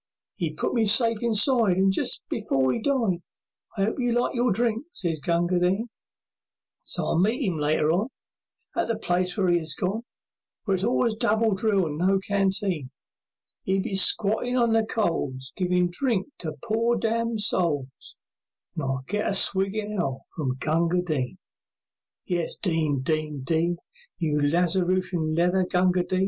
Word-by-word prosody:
'E 165 -4 -1
put - - -1
me 230 - +2
safe 230 +1 +3
inside, 230 -3 +3
And 195 0 +4
just - - -2
before 135 - 0
'e - - -3
died, 225 -10 0 0.6
"I 195 - +2
'ope 220 - -2
you 245 -1 +1
liked 245 - 0
your 245 -1 +1
drink," 230 +4 0
sez 170 - -3
Gunga 175 +3 +1
Din. 190 +7 0 0.9
So - - -2
I'll 170 - +2
see 220 +5 0
'im 175 -5 -1
later 150 +1 +2
on, 190 +7 +1 0.7
In 345 - +1
the 230 -1 -1
place 180 -3 -1
where 195 -3 +2
'e 175 - +3
is 160 -1 -4
gone, 200 +3 -2 0.6
Where 200 - 0
it's 190 0 0
always 235 0 +2
double 220 -1 +1
drill 195 -1 +1
and 150 -1 -4
no 190 +2 +3
canteen; 195 -6 -1 0.8
'E'll 190 0 +1
be - - -4
squattin' 215 +6 +2
on 235 -2 +3
the 225 0 +3
coals, 140 -12 -2
Givin' 180 -1 +1
drink 220 -1 0
to 155 -3 -5
poor 230 +1 +1
damned 230 -1 -1
souls, 150 - 0 0.6
And - - -4
I'll 135 -1 -2
get 210 +2 -1
a 195 - 0
swig 195 +1 +3
in 210 -1 -3
hell 135 -7 -2
from 135 -6 -2
Gunga 170 +5 +1
Din! 145 -8 -2 0.9
And 175 - 0
it's 170 - -3
"Din! 155 -7 0
Din! 155 -2 -2
Din!" 165 +4 0 0.4
You 150 -3 0
Lazarushian 175 +1 +1
leather 180 +2 +3
Gunga 180 0 +2
Din! 185 +1 -1
185 Hz, 165 wpm, -25 LUFS, 165-220 Hz, 0.9 s, And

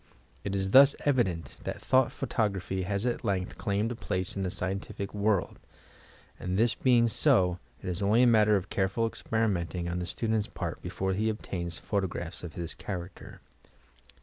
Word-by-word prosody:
It 100 -1 -2
is 95 0 -1
thus 140 +3 +8
evident 95 - 0
that - - -4
Thought 130 -1 +3
Photography 95 -3 -1
has 100 +4 -1
at 120 0 -1
length 95 -4 -2
claimed 105 +3 0
a - - -3
place 95 -5 -3
in 100 - -2
the 95 - -1
scien 95 +2 -2
tific 100 0 -7
world, 105 -2 0 0.8
and, 90 +1 -2
this 115 +2 +3
being 120 -1 +4
so, 90 -4 +3 0.2
it - - -6
is 90 +1 -2
only 105 +5 +4
a - - +7
matter 110 -3 +5
of 95 -1 -2
care 95 -1 +1
ful 115 +4 0
experimenting 95 -7 -1
on 85 +1 -2
the 90 - -3
student's 110 -2 -1
part - - -5
before 95 0 -2
he 110 +4 +1
obtains 85 -6 -4
photographs 90 -4 -3
of 85 -3 -7
this 85 -2 -4
character. 90 -2 -7
100 Hz, 175 wpm, -29 LUFS, 90-110 Hz, 0.8 s, thus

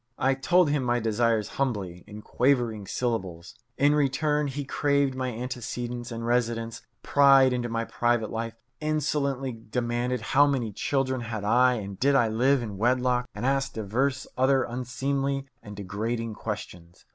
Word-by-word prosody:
I 135 +1 +2
told 165 +4 +3
him 145 -2 +1
my 120 0 +1
desires 115 -1 +1
humbly, 100 -10 -2
in 105 +1 -10
quavering 120 -6 +1
syllables. 95 -9 -3 0.2
In 145 +1 +4
return, 150 +1 +1
he 140 +1 -4
craved 140 -1 +1
my 130 -1 -2
antecedents 120 0 -5
and 115 0 -5
residence, 115 -1 -1 0.2
pried 135 -2 +5
into 120 -1 -2
my 115 0 -2
private 120 -2 0
life, 115 0 -4 0.2
insolently 140 -3 -1
demanded 120 +2 -2
how 145 +6 +4
many 125 -6 -1
children 130 +2 -1
had 110 -3 -5
I 125 +4 +4
and 100 -4 -6
did 140 +1 +3
I 120 -4 +4
live 125 +4 +2
in 105 -4 -6
wedlock, 125 +1 +1
and - - -4
asked 135 0 0
divers 130 +6 -1
other 130 +1 +3
unseemly 135 +3 -2 0.2
and 105 0 -10
degrading 110 +4 -3
questions. 90 -6 -7
125 Hz, 150 wpm, -27 LUFS, 115-135 Hz, 0.2 s, pried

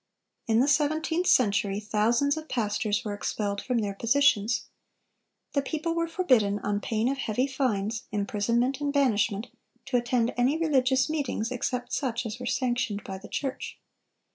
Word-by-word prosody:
In 225 +1 +4
the 270 - +3
seventeenth 315 +4 +1
century 200 -4 +3
thousands 230 +7 +1
of 315 0 -7
pastors 210 -2 -1
were 210 - -2
expelled 205 0 -2
from 250 -2 -1
their 205 -3 -1
positions. 230 0 +2 0.9
The 280 - +2
people 315 +4 -2
were 335 0 0
forbidden, 250 - +2
on 205 0 -1
pain 220 +2 0
of 270 +1 -1
heavy 245 +1 0
fines, 235 -4 -1
imprisonment, 230 +6 0
and 290 -1 0
banishment, 230 -5 +1 0.4
to 270 -2 +1
attend 240 -1 +1
any 255 +5 +2
religious 265 -5 +2
meetings 280 -7 -2
except 250 0 -3
such 245 -3 -1
as 225 +2 -5
were 250 - -5
sanctioned 240 -6 -1
by 190 -1 -6
the 200 - -11
church. 270 -2 -4
245 Hz, 155 wpm, -27 LUFS, 210-275 Hz, 0.9 s, In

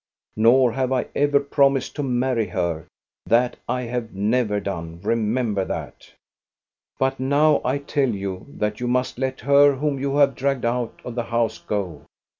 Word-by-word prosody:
Nor 120 +3 +5
have 130 +1 -1
I 130 - +1
ever 145 0 +3
promised 140 -1 +1
to 150 - -2
marry 125 -3 0
her; 85 -5 -2 0.4
that 120 +2 +2
I 125 0 -1
have 120 -3 -4
never 105 +1 +1
done. 85 -4 -5
Remember 110 -2 0
that! - - -7 0.4
" - - -64
But 135 0 0
now 145 +3 +3
I 130 +3 0
tell 140 -1 0
you 95 -3 -4
that 105 -5 -3
you 125 - -2
must 125 0 -1
let 130 0 -2
her 140 0 +5
whom 140 0 -1
you 140 +1 -1
have 140 -1 +4
dragged 135 0 -1
out 120 0 -2
of 125 - -5
the 120 -1 -3
house 115 -1 -1
go. 95 -8 -4
125 Hz, 170 wpm, -23 LUFS, 110-135 Hz, 0.4 s, Nor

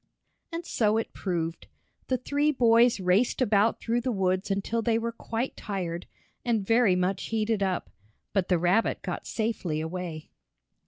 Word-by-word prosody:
And 335 +1 -4
so 215 -8 +2
it 225 - -3
proved. 165 -3 -3 0.4
The 260 - +1
three 290 +4 +1
boys 235 -3 +4
raced 190 +6 +2
about 215 -3 +3
through 235 +1 0
the 255 +1 -1
woods 190 -1 0
until 200 +4 0
they 225 0 +2
were 230 0 -2
quite 230 +2 -4
tired, 180 -5 -4 0.4
and 225 -5 0
very 225 -3 +4
much 180 +1 0
heated 220 -1 0
up. 190 -2 -1 0.4
But 195 -3 +1
the 180 - +3
rabbit 180 +6 +1
got - - -4
safely 215 -8 -2
away. 160 -1 -5
210 Hz, 155 wpm, -27 LUFS, 185-230 Hz, 0.4 s, boys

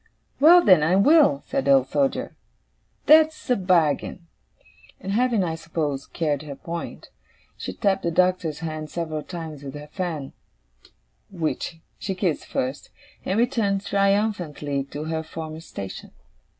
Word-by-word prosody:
'Well, 340 +5 +7
then, 185 -5 +7
I 165 +4 +3
will!' 240 - +5
said 275 0 -2
the 280 - +6
Old 270 - +3
Soldier. 275 -2 0 0.7
'That's 310 +1 +5
a - - +5
bargain.' 175 -3 +1 0.7
And 195 - -5
having, 230 -1 +2
I 165 -2 -2
suppose, 160 -4 -3
carried 150 -4 -1
her 145 -2 -8
point, 170 +4 -7 0.4
she - - -6
tapped 195 -3 +1
the 170 - -1
Doctor's 180 -3 +1
hand 155 -1 -5
several 160 -2 -3
times 160 -3 -7
with 140 0 -8
her 145 0 -9
fan 160 -7 -4 1.0
(which 165 -2 -3 0.2
she 190 - -3
kissed 180 -4 -1
first), 130 +3 -3 0.4
and 190 - 0
returned 220 -5 +1
triumphantly 195 -9 0
to 145 +2 -7
her 160 0 -2
former 160 0 -7
station. 100 - -8
170 Hz, 140 wpm, -24 LUFS, 155-200 Hz, 1.0 s, Well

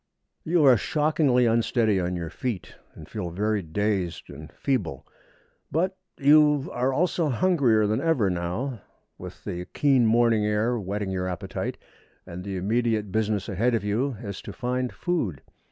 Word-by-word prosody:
You 165 -1 +2
are 130 -3 +7
shockingly 150 - +2
unsteady 115 -2 +2
on 90 0 -1
your 85 -2 -5
feet, 120 -4 -4 0.2
and 80 - -11
feel 95 -5 -4
very 105 +4 0
dazed 90 0 -2
and 75 +2 -10
feeble; 125 - -2 0.7
but 180 +5 0 0.2
you 150 -1 +4
are 125 +2 +1
also 165 +2 +1
hungrier 130 -7 +3
than 110 +2 0
ever 160 -11 +2
now, 90 +8 -3 0.4
with - - -10
the 90 0 -5
keen 135 -5 +4
morning 115 -1 +3
air 105 +3 +1
whetting 100 0 -3
your 90 -1 -2
appetite, 90 -2 -4 0.5
and 90 +1 -8
the 100 -1 -4
immediate 110 +1 0
business 105 -1 0
ahead 115 +4 +1
of 110 - -1
you 115 +5 -1
is 100 -3 -6
to - - -8
find 125 0 -2
food. 120 - -2
110 Hz, 155 wpm, -26 LUFS, 95-135 Hz, 0.7 s, are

